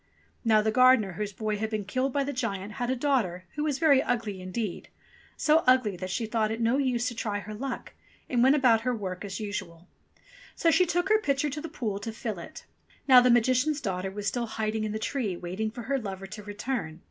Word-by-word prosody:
Now 220 -2 +4
the 220 - +1
gardener 255 -4 +5
whose 205 +3 -4
boy 215 +1 -2
had 220 +1 -2
been 215 -2 -3
killed 255 +7 -1
by 280 +1 +1
the 285 +1 -3
giant 205 -5 -3
had 245 +3 -3
a 260 - +1
daughter 235 -10 0
who 300 - -2
was 295 -3 0
very 285 -4 +5
ugly 215 -5 -2
indeed 185 +1 -4 0.2
— - - -28
so 310 +1 +4
ugly 255 -6 +4
that 185 +1 -6
she 225 +5 -1
thought 220 -1 0
it 225 +1 -3
no 230 +3 +2
use 250 -3 +1
to - - -7
try 215 -3 -2
her 210 +1 -7
luck, 260 +5 -5 0.3
and 245 -2 +1
went 265 +3 +6
about 245 -6 +4
her 250 +1 0
work 185 -4 -5
as 195 -2 -5
usual. 190 -5 -6 0.7
So 330 - +3
she 365 +2 +4
took 355 +3 0
her 430 0 +4
pitcher 280 -3 0
to 300 +2 -5
the 330 - -6
pool 220 -9 -3
to 225 +2 -5
fill 220 -4 -5
it. 170 - -10 0.4
Now 255 -2 +9
the 250 - +4
Magician's 255 +5 +3
daughter 190 -4 -3
was 200 +1 -6
still 235 +3 -1
hiding 220 0 -2
in 215 - -3
the 215 - -2
tree 220 -4 -2
waiting 185 +6 -3
for 235 +2 -8
her 275 +3 0
lover 195 -4 -6
to 210 +2 -8
return. 205 -5 -4
225 Hz, 230 wpm, -28 LUFS, 205-260 Hz, 0.7 s, Now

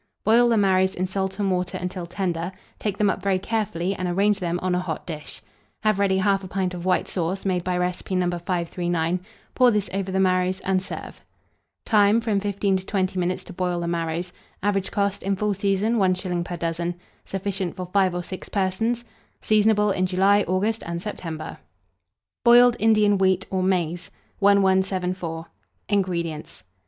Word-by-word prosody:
Boil 235 +3 +5
the 230 - +3
marrows 190 -1 +3
in 185 - -1
salt 190 0 -2
and 200 -2 0
water 180 -1 -1
until 180 -1 -4
tender; 175 -1 -2 0.3
take 205 -2 -2
them 210 - +2
up - - -5
very 195 0 +1
carefully, 195 -3 -1
and 185 -2 -3
arrange 200 +3 +2
them 175 -1 -1
on 185 -1 +1
a 180 - +1
hot 175 -4 -4
dish. 155 -3 -8 0.4
Have 215 -3 +2
ready 190 -1 +2
1/2 195 -1 +1
pint 185 -1 -1
of 175 0 -6
white 185 - +2
sauce, 185 +2 -2
made 180 -2 0
by 180 0 -1
recipe 180 +1 -2
No. 180 -1 +2
539; 175 -1 -1 0.3
pour 255 -1 +5
this 210 -3 0
over 195 -1 -2
the 190 - 0
marrows, 185 0 +2
and 190 -1 +1
serve. 190 - -8 0.6
Time. 210 0 +4
From 220 -3 0
15 200 -1 0
to 185 - -7
20 185 -2 0
minutes 180 +1 -1
to - - -10
boil 180 -1 -1
the 170 - -3
marrows. 170 +1 -2 0.3
Average 195 -2 0
cost, 200 -1 -1
in 195 0 0
full 210 +1 0
season, 200 +4 +1
1s. 185 -3 0
per 175 - -5
dozen. 170 +1 -2 0.3
Sufficient 195 -2 -3
for 185 -1 -5
5 185 0 +1
or 175 - -2
6 185 +1 -7
persons. 225 +5 -1 0.4
Seasonable 210 -1 +3
in 185 -1 +1
July, 195 +2 +3
August, 205 +5 0
and 170 0 -4
September. 165 -5 -6 0.8
BOILED 240 0 +7
INDIAN 210 -2 +4
WHEAT 190 0 +2
or 190 -1 0
MAIZE. 180 -2 0 0.3
1174. 190 -4 +2 0.4
INGREDIENTS. 170 - -2
190 Hz, 170 wpm, -24 LUFS, 180-200 Hz, 0.8 s, BOILED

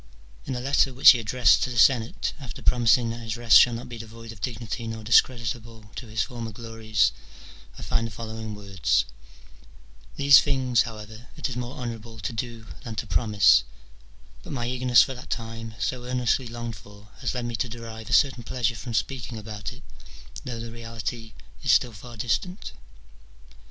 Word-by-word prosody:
In 130 - -2
a - - -3
letter 135 0 +2
which 130 - +10
he 125 - +1
addressed 115 +1 +3
to - - 0
the 120 - -5
Senate, 115 -1 +3
after 130 -4 -9
pro 125 - +3
mising 115 0 +4
that 115 - -6
his 110 -1 -4
rest 120 -1 +7
shall 120 -2 +5
not 115 - -7
be 120 -2 -8
devoid 115 +1 -10
of 110 -3 -13
dignity 115 -1 -4
nor 110 -1 -5
discreditable 115 -1 +1
to 125 - -7
his 110 -1 -1
former 115 -2 -6
glories, 110 -2 0 0.7
I - - -8
find 115 - 0
the - - -10
following 110 0 -6
words: 100 -2 0 0.3
— - - -24
" - - -25
These 140 -1 +7
things, 130 -4 +2
however, 110 +2 -11
it - - -2
is - - -5
more 125 +1 -5
honourable 115 -2 -6
to 115 - -4
do 115 -1 -5 0.2
than 115 -4 -6
to 110 - -3
promise: 95 - +4 0.8
but - - -8
my 120 -3 -2
eagerness 125 -1 +5
for 135 - -4
that 125 - -11
time, 115 -1 -5
so 125 -1 -2
earnestly 125 0 0
longed 120 -1 -6
for, 100 +1 -16
has - - -2
led 125 -1 -2
me 120 -1 -3
to 125 - -2
derive 115 -1 -8
a - - -2
certain 135 -4 +4
pleasure 120 0 -1
from 115 +1 -6
speaking 120 +1 -2
about 105 0 -6
it, 125 +4 -14 0.6
though 120 -3 -5
the 115 0 -6
reality 115 -1 -6 0.3
is - - +2
still 120 -2 +3
far 115 +3 -11
distant." 180 - -2
115 Hz, 190 wpm, -26 LUFS, 110-125 Hz, 0.8 s, which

